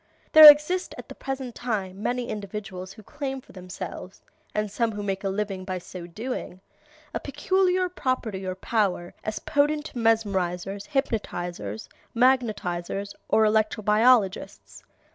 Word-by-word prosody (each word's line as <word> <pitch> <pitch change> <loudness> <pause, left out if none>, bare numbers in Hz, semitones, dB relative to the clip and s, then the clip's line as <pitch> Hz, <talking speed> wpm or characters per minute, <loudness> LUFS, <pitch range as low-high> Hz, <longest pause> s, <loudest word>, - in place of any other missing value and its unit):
There 310 -1 +12
exist 300 +6 -2
at - - -10
the - - -7
present 265 -2 -5
time 200 -5 -4
many 245 +2 -1
individuals 195 -3 -6
who 215 - -14
claim 275 +1 -5
for - - -18
themselves, 185 0 -8 0.3
and 210 -1 -1
some 230 +1 0
who 205 0 -5
make 195 -1 -3
a 195 - 0
living 195 -1 -3
by 185 -1 -4
so 175 0 -9
doing, 215 0 -6 0.5
a - - -1
peculiar 370 +5 +1
property 255 - -3
or 185 -1 -3
power 190 -4 -1
as 215 0 -3
potent 295 +1 0
mesmerizers, 200 -4 0
hypnotizers, 175 - -3 0.3
magnetizers, 205 -6 0 0.2
or 220 - +4
electro 215 0 +1
biologists. 215 -1 +2
215 Hz, 135 wpm, -25 LUFS, 190-255 Hz, 0.5 s, There